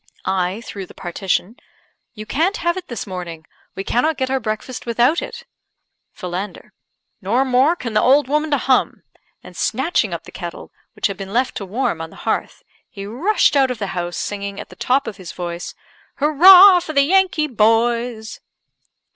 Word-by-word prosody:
I 190 +2 -1
(through 200 -4 -8
the - - -16
partition 190 +5 -3 0.3
): - - -46
"You 215 -1 -8
can't 340 - 0
have 345 0 0
it 375 - -7
this 245 +1 -5
morning. 175 -5 -7 0.3
We 195 - -4
cannot 295 +9 0
get 260 0 -2
our 265 - +1
breakfast 220 +2 -5
without 240 +7 +2
it." 475 0 -8 0.7
Philander: 185 +1 -6 0.5
"Nor 235 +8 +1
more 265 +6 +3
can 240 -9 -6
the 215 - +3
old 275 +2 +4
woman 300 +3 0
to 290 - +2
hum," 260 0 +1 0.4
and, - - -13
snatching 265 +9 0
up - - -5
the - - -13
kettle, - - -8 0.2
which - - -4
had 200 -3 -1
been 195 -1 -7
left 255 +2 +1
to 200 - -6
warm 195 -5 -2
on 165 - -6
the - - -16
hearth, - - -2 0.3
he 195 -1 -8
rushed 295 - +1
out 270 -2 +4
of 250 - -3
the 200 -2 -4
house, 175 -1 -4
singing, 200 -1 -4
at - - -9
the - - -13
top 270 +3 +1
of 200 - -7
his 185 -3 -9
voice 175 -1 -6 0.4
"Hurrah 360 +6 +8
for 330 -2 -7
the 280 -1 +4
Yankee 365 -1 +2
Boys!" 230 -1 0
240 Hz, 185 wpm, -19 LUFS, 195-285 Hz, 0.7 s, Hurrah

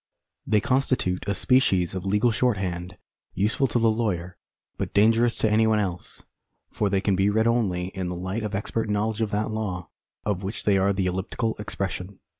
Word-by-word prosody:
They 105 -1 +3
constitute 125 -7 0
a 100 - +1
species 95 -10 +2
of 95 +1 -4
legal 105 +4 +3
shorthand, 95 -6 -1 0.4
useful 110 +8 +1
to 120 - 0
the 115 -1 +4
lawyer, 95 -6 -2 0.4
but - - -4
dangerous 115 +3 +4
to - - +1
any 110 +1 +3
one 110 -1 +3
else; 90 -4 -3 0.5
for 105 - 0
they 100 -1 +1
can 100 -1 +1
be 95 +2 +2
read 110 +2 +2
only 100 -7 +1
in 95 -2 -4
the 90 - -4
light 95 +5 -3
of 105 -2 -3
expert 110 +2 -2
knowledge 105 +1 0
of 110 - +1
that 105 +1 -1
law 95 -6 -3 0.4
of 100 -3 -1
which 100 +3 -5
they 100 -2 +3
are 100 +1 +3
the 95 -1 0
elliptical 95 +5 -2
expression. 100 -2 -4
105 Hz, 190 wpm, -25 LUFS, 95-110 Hz, 0.5 s, the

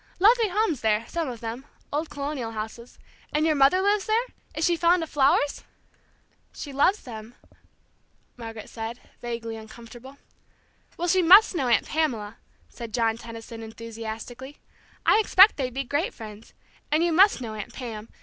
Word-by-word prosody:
Lovely 450 +4 +5
homes 395 - 0
there, 220 0 +1
some 330 -4 -3
of 240 -3 -8
them, 230 +3 -5 0.3
old 305 +2 -1
colonial 280 -5 -4
houses. 220 +2 -7 0.3
And 300 +1 +1
your 320 - +3
mother 285 +6 +4
lives 405 0 +1
there? 445 +2 +2 0.3
Is 315 - 0
she 345 - +3
fond 345 +1 +3
of 320 - -8
flowers?" 285 0 +2 0.9
"She 285 - -7
loves 330 +9 +2
them," 225 -2 -9 1.0
Margaret 225 -2 -8
said, 225 +1 -6 0.2
vaguely 230 -1 -5
uncomfortable. 235 +4 -12 0.8
"Well, 350 - -2
she 370 +2 +4
must 385 +6 +7
know 285 -8 -1
Aunt 235 -3 +3
Pamela," 235 -9 -2 0.3
said 230 -2 -7
John 225 -2 +1
Tenison, 230 0 -9
enthusiastically. 230 +4 -8 0.5
"I - - +5
expect 405 -1 +6
they'd 260 -3 -2
be 270 +2 -3
great 305 - -2
friends. 215 -1 -11 0.4
And 310 +2 +3
you 345 -1 +1
must 390 +1 +5
know 230 -4 -6
Aunt 210 -2 -7
Pam. 225 -4 -7
255 Hz, 160 wpm, -25 LUFS, 225-330 Hz, 1.0 s, must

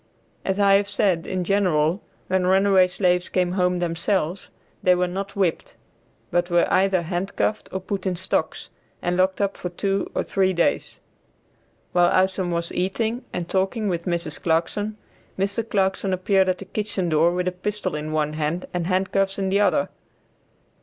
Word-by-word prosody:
As 190 +1 -1
I 200 -1 +6
have 200 0 -2
said, 195 -5 +1
in 185 -1 -2
general, 175 -3 +1 0.2
when 185 -1 +1
runaway 190 0 +5
slaves 180 -1 +1
came 180 -1 +1
home 180 -1 +1
themselves, 175 +1 -1 0.3
they 180 0 +4
were 180 0 +1
not 195 +2 -5
whipped, 190 -5 -1 0.6
but 175 +1 +1
were 175 0 +4
either 190 -2 +3
handcuffed 190 +5 -2
or 190 - -2
put 195 0 -3
in 185 - 0
stocks, 185 +2 -2 0.3
and 175 0 0
locked 185 +1 +2
up 200 0 0
for 180 - -5
two 195 +2 -1
or - - +1
three 190 -1 +1
days. 170 -1 0 0.9
While 175 -1 +4
Isom 185 -1 +2
was 170 0 -2
eating 220 +6 -1
and 170 - -4
talking 195 +3 0
with 170 -2 -2
Mrs. 170 -3 -2
Clarkson, 205 +6 0 0.4
Mr. 200 +4 -1
Clarkson 190 -1 0
appeared 190 +1 +2
at 185 - +1
the 195 - -9
kitchen 200 -2 -2
door 160 +2 +4
with 180 +1 -1
a - - +2
pistol 185 -1 -3
in 150 +1 -4
one 155 -1 0
hand 155 +3 -2
and 175 -1 -1
handcuffs 195 +1 0
in 195 -1 -1
the 195 +1 +2
other. 205 - +2
185 Hz, 170 wpm, -23 LUFS, 175-195 Hz, 0.9 s, I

